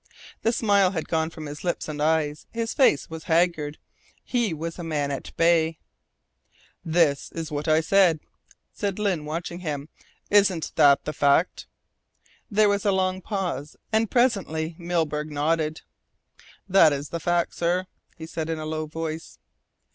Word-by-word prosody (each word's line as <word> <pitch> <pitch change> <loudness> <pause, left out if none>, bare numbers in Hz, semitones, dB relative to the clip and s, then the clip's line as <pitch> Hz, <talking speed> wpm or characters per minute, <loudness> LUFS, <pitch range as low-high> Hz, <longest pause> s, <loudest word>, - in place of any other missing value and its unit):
The 230 - +2
smile 200 -5 +3
had 160 -4 -3
gone 160 -1 0
from 160 -1 -9
his 145 0 -8
lips 175 -1 -2
and 150 -1 -5
eyes. 155 -1 0
His 230 0 -3
face 255 - +3
was 160 0 -8
haggard 160 -3 +1 0.5
he 240 -5 0
was 165 +2 -5
a - - -5
man 150 -3 -1
at 140 - -5
bay. 165 -1 +3 1.1
"That 160 -4 +2
is 165 -1 -5
what 150 +1 -3
I 155 0 +4
said," 175 -1 +4 0.5
said 200 -3 -2
Lyne 190 -7 -1
watching 170 +3 -4
him. 150 -4 -4 0.4
"Isn't 195 -5 +3
that 140 -1 +5
the 155 - -3
fact?" 145 +4 +2 0.8
There 210 -1 +4
was 200 -1 +1
a 205 - +3
long 185 0 0
pause, 175 -9 -3 0.2
and 220 -1 +2
presently 185 -10 +1
Milburgh 160 -3 -1
nodded. 155 +1 0 0.9
"That 180 -6 +6
is 145 +1 -4
the 170 - -4
fact, 175 +1 0
sir," 175 +2 0 0.3
he 160 - -7
said 160 -1 -4
in 165 - -1
a 155 - -5
low 155 0 -3
voice. 160 +1 -5
165 Hz, 155 wpm, -25 LUFS, 155-185 Hz, 1.1 s, That